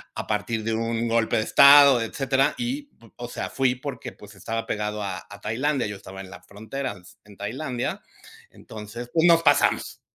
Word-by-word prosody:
a - - -4
partir 110 +1 -2
de 115 +1 -1
un 115 +1 -1
golpe 115 -1 +1
de 110 - +1
estado, 140 0 +7
etcétera. 135 +3 0
Y 270 +4 -4 0.3
o 120 0 -6
sea, - - -5
fui 130 -2 +1
porque, 130 -1 -7
pues, 105 0 -15
estaba 115 +4 -4
pegado 105 0 -3
a 95 -2 -4
a 100 +1 -12
Tailandia. 130 +6 -1
Yo 105 - -6
estaba 95 0 -10
en 95 - -11
la 100 - -11
frontera, 110 +4 -6 0.3
en 105 -2 -16
Tailandia, 125 +4 -4 0.5
entonces, 110 +3 -9
pues, 165 +1 +4
nos 165 -1 +5
pasamos. - - +2
115 Hz, 175 wpm, -24 LUFS, 105-135 Hz, 0.5 s, estado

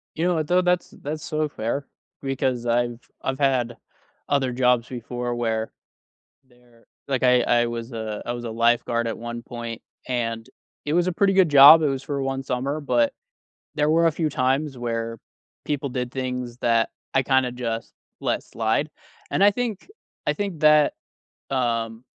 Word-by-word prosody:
You 160 - -2
know 180 -1 +2
what, 155 -2 -1
though? 180 +2 +4
That's 180 -1 0
that's 155 +2 -5
sorta 155 -1 -1
fair 120 +6 -2 0.4
because 130 -3 -1
I've 120 0 0 0.2
I've 130 +1 -3
had 130 -4 +1 0.5
other 135 -3 +1
jobs 125 -1 +2
before 120 0 -4
where 110 -2 -1 0.8
there 120 -2 -25 0.2
like, 135 -3 0
I 125 -1 +5
I 120 0 +3
was 120 +1 -5
a 110 -2 -4
I 120 - -1
was 120 0 -5
a 115 - -4
lifeguard 115 +1 +1
at 115 - -2
one 120 0 -6
point, 115 -1 -7 0.3
and 115 -2 -2 0.4
it 150 +1 -1
was 175 +1 +3
a 185 - 0
pretty 195 +3 +2
good 190 -3 +5
job. 145 +3 +9
It - - +3
was 135 -1 -2
for 140 0 -3
1 135 0 -2
summer, 135 +4 -2
but 285 - +2 0.6
there 150 0 +2
were 165 +2 +4
a - - +2
few 155 0 -1
times 135 +1 0
where 115 -1 -3 0.5
people 145 -1 -2
did 125 -1 -3
things 125 -2 -4
that 115 -2 +2 0.3
I 135 - +4
kinda 130 -1 +2
just 115 -2 -4 0.3
let - - -1
slide. - - -1 0.4
And, 195 - +2
I 205 - +8
think 225 -3 -3 0.4
I - - +3
think 200 -6 -4
that, 150 -1 +5 0.6
um, 115 -3 -1
125 Hz, 175 wpm, -24 LUFS, 120-150 Hz, 0.8 s, job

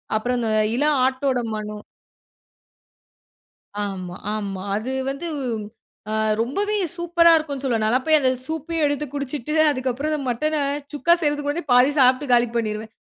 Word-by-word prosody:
அப்புறம் 245 +3 0
அந்த 225 -1 -1 0.3
இளம் 295 0 +2
ஆட்டோட 260 0 0 0.2
மணம்! 210 0 -6 2.0
ஆமா, 185 -3 -5 0.2
ஆமா. 195 -3 -4
அது 230 +5 -3 0.2
வந்து 280 +5 -5 0.9
அ - - 0 0.3
ரொம்பவே 400 - -1 0.2
சூப்பரா 340 -1 +4
இருக்குன்னு 285 -4 -3
சொல்லுவேன். 235 -4 0
நான்லாம் 255 +4 +1
போய் 315 -1 +5
அந்த 260 - +3 0.2
சூப்பயே 320 +1 -3
எடுத்து 290 +1 -1
குடிச்சிட்டு, 285 0 -4 0.2
அதுக்கப்புறம் 260 +2 -2
அந்த 300 - -1
மட்டன 305 +6 -1 0.4
சுக்கா 315 +4 +2
செய்றதுக்கு 295 -1 0
முன்னாடியே 300 +1 -3
பாதி 250 +3 +6
சாப்ட்டு 255 +2 +4
காலி 240 0 +5
பண்ணிருவேன். 215 -1 -2
265 Hz, 140 wpm, -22 LUFS, 235-300 Hz, 2.0 s, பாதி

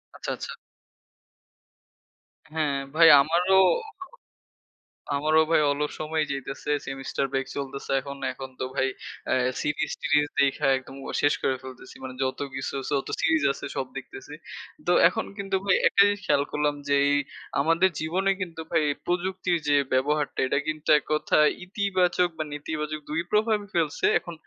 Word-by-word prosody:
আচ্ছা, - - -6
আচ্ছা। - - -7 2.0
হ্যাঁ 150 -3 0 0.2
ভাই 165 0 +7
আমারও 175 +6 +2 1.6
আমারও 155 +2 +3
ভাই 165 - +5
অলস 145 +1 -1
সময় 155 0 -1
যাইতেছে। 135 +1 -4 0.2
সেমিস্টার 135 0 -3
ব্রেক 135 -1 -1
চলতেছে 140 0 -5
এখন। 140 +1 -8 0.2
এখন 130 +1 -8
তো 130 - -1
ভাই, 135 -1 +2 0.4
অ্যা - - +2 0.3
সিরিজ-টিরজ 150 0 0
দেইখা 140 -1 +2
একদম 130 +1 -10 0.3
শেষ 145 - +4
করে 130 - +1
ফেলতেছি। 130 -1 -11
মানে 130 -1 -6
যত 130 0 -2 0.2
কিছু 135 +2 -4 0.2
যত 140 -2 0
সিরিজ 160 -2 +2
আছে - - -8
সব 130 - -1
দেখতেছি। 400 -1 -9 0.5
তো - - +4 0.2
এখন - - -3
কিন্তু 195 -1 -2
ভাই 190 - +4
একটা - - +4
জিনিস 205 0 -1
খেয়াল 140 - +3
করলাম, 150 0 0
যে 140 - +4 0.6
আমাদের 165 +5 +3
জীবনে 185 +5 0
কিন্তু 165 -3 -5
ভাই 155 - +3 0.2
প্রযুক্তির 180 0 0
যে 145 - +5 0.2
ব্যবহারটা, 145 +3 0
এটা 140 - +1
কিন্তু 155 0 -3
এককথায় 150 0 +2 0.2
ইতিবাচক 185 -2 +1
বা 155 - -1
নেতিবাচক 150 +1 -4
দুই 155 +2 0
প্রভাবই 210 -1 +1
ফেলছে। 160 -4 0
এখন 175 - -9
150 Hz, 140 wpm, -26 LUFS, 140-175 Hz, 2.0 s, ভাই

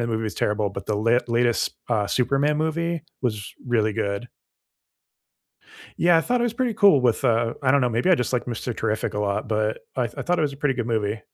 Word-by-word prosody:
that 115 - -2
movie 110 0 -1
was 110 - -4
terrible, 105 -1 0
but 100 0 -7
the 105 - 0
la 115 +3 +3
latest, 120 0 +1 0.2
uh, 105 -2 0
Superman 140 +5 +1
movie 165 +1 -1 0.2
was 110 -5 -3
really 110 -3 +1
good. 100 +4 -3 1.7
Yeah, 170 -1 +5
I - - +3
thought 245 +7 0
it - - +2
was 240 - 0
pretty 245 -1 -1
cool 195 -9 +5
with, 125 +1 +1
uh 115 -1 +2
I 130 - +3
don't 140 +1 +4
know, 125 - +2
maybe 120 +10 +1
I - - +7
just 125 -5 -2
like 125 - 0
Mr. 120 -1 -4
Terrific 110 -1 -2
a - - -2
lot, 100 +2 -1
but 110 0 0 0.2
I 130 - +1
I 115 - -5
thought 175 0 0
it - - +1
was 145 -2 0
a - - -10
pretty 140 -1 0
good 120 -2 -3
movie. 110 -2 -1
120 Hz, 235 wpm, -24 LUFS, 110-145 Hz, 1.7 s, I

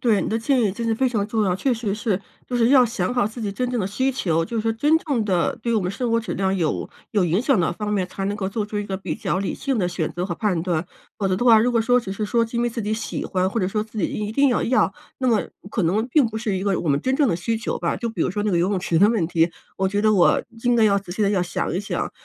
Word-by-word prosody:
对， 225 -6 +3
你 - - -2
的 225 - 0
建 255 +2 +1
议 205 -4 +1
真 230 +3 -5
的 225 - +2
非 260 +3 +1
常 215 -5 -1
重 220 -1 +1
要。 180 -2 +1
确 255 +7 0
实 220 -4 -2
是， 205 -2 -1 0.3
就 250 - -1
是 235 0 +3
要 260 -3 +7
想 225 -3 -2
好 245 -4 +2
自 220 +3 -7
己 205 -2 -2
真 250 +4 -2
正 245 - -1
的 190 - 0
需 260 +7 0
求， 165 -10 0
就 230 +7 -5
是 - - +1
说 225 +1 0
真 295 +8 +3
正 270 -9 -1
的 180 -4 +1
对 235 - 0
我 220 - +2
们 180 - -2
生 235 +4 -2
活 230 - +3
质 230 - -4
量 195 0 0
有 165 -4 -1 0.2
有 200 -4 +3
影 175 +5 +1
响 260 -4 +2
的 170 - +1
方 210 +3 -3
面， 190 -3 +1
才 195 - -5
能 205 +1 -1
够 190 -2 -2
做 210 +1 -3
出 210 - -6
一 205 - -2
个 195 -2 -3
比 195 - -4
较 - - -2
理 195 - -2
性 270 -4 -2
地 180 - +1
选 175 -3 -2
择 175 +1 -3
和 175 - -3
判 185 -4 0
断。 170 -2 -1 0.3
否 195 -2 0
则 185 - +1
的 240 - -1
话， 230 -3 +8
如 245 - +2
果 230 -2 +2
说 245 +2 +3
只 195 -5 -6
是 210 +2 -3
说 230 +2 +2
是 230 +1 -6
因 235 - +1
为 240 - +2
自 230 0 -4
己 210 +1 -2
喜 220 - -3
欢， 185 -1 0
或 225 +2 -2
者 185 - 0
说 210 +1 -1
自 220 0 -15
己 - - +1
一 210 0 -4
定 280 +3 +4
要 245 - +1
要， 255 +3 +2 0.3
那 260 -1 +1
么 220 -3 +3 0.3
可 205 -5 0
能 205 +7 +1
并 280 -1 +4
不 220 -1 -5
是 215 -4 -1
一 185 - -3
个 200 -2 +1
我 165 - -3
们 140 0 +2
真 260 - 0
正 280 -2 +3
的 165 - +1
需 225 +6 -1
求 225 - -3
吧。 - - -1
就 235 - -3
比 220 -6 -6
如 - - +1
说 205 +2 -2
那 210 - 0
个 175 - +2
游 175 +3 +2
泳 195 -3 0
池 170 -3 +1
的 205 +3 +6
问 220 -7 +1
题， 165 0 +2 0.3
我 190 - +1
觉 205 +2 -1
得 215 0 +4
我 180 -4 +4 0.2
应 245 0 +3
该 230 - +3
要 200 -2 +4
仔 185 -3 -8
细 210 - -1
地 200 - +3
要 195 -3 +1
想 175 -2 -2
一 180 - -1
想， 200 - -3
210 Hz, 355 characters per minute, -22 LUFS, 190-235 Hz, 0.3 s, 话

